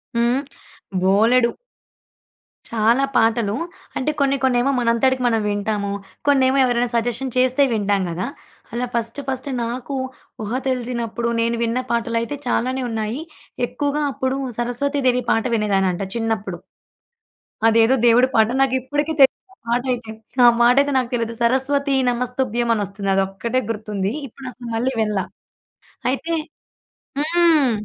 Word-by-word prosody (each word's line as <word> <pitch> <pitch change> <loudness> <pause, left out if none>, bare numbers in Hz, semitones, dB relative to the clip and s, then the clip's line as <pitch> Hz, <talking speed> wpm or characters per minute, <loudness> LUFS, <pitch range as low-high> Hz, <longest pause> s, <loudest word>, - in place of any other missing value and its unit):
హ్మ్. 240 +3 +2 0.6
బోలెడు. 225 +6 +4 1.2
చాలా 230 +4 +3
పాటలు. 225 -2 +2 0.4
అంటే 280 +4 0
కొన్ని 275 0 +2
కొన్నేమో 255 +1 +3
మనంతటికి 250 +2 +2
మనం 225 -2 +2
వింటాము. 205 0 -1 0.4
కొన్నేమో 270 -1 +4
ఎవరైనా 245 -1 +1
సజెషన్ 240 +2 -1
చేస్తే 255 +2 +3
వింటాం 205 -2 +1
కదా! 175 +3 -3 0.5
అలా 245 +1 -1
ఫస్ట్ 230 +3 -2
ఫస్ట్ 265 +1 -3
నాకు 245 +4 -4 0.5
ఊహ 215 - -5 0.2
తెలిసినప్పుడు 235 -2 -2
నేను 230 +1 +1
విన్న 230 +2 0
పాటలయితే 235 +2 -1
చాలానే 255 +2 0
ఉన్నాయి. 225 +4 -3 0.5
ఎక్కువగా 290 0 -2
అప్పుడు 260 +1 -1 0.2
సరస్వతి 275 +4 -1
దేవి 250 0 +2
పాట 225 - +1
వినేదాన్నంట 195 -4 +1
చిన్నప్పుడు. 220 -5 -2 1.1
అదేదో 225 +2 +5
దేవుడి 240 +2 +6
పాట 220 -1 +5
నాకు 270 -1 +3
ఇప్పటికి 290 +4 -1
తెలీదు 265 - +7 0.2
ఆ - - -21
పాటైతే. 240 -1 -1 0.3
ఆ - - +9
మా 235 - +7
టైతే 285 +1 +4
నాకు 250 -2 0
తెలియదు. 230 -1 -1
సరస్వతి 270 +3 +2
నమస్తుభ్యం 245 -1 -1
అనొస్తుంది. 200 -1 -3
అదొక్కటే 195 +6 0
గుర్తుంది. 210 -2 -2
ఇప్పుడు 265 +2 -11
అసలు 240 0 -9
మళ్ళీ 250 +4 0
వినల. 210 -3 0 0.9
అయితే 330 +5 -2 0.8
హ్మ్. 315 -3 +3
240 Hz, 125 wpm, -21 LUFS, 225-260 Hz, 1.2 s, ఆ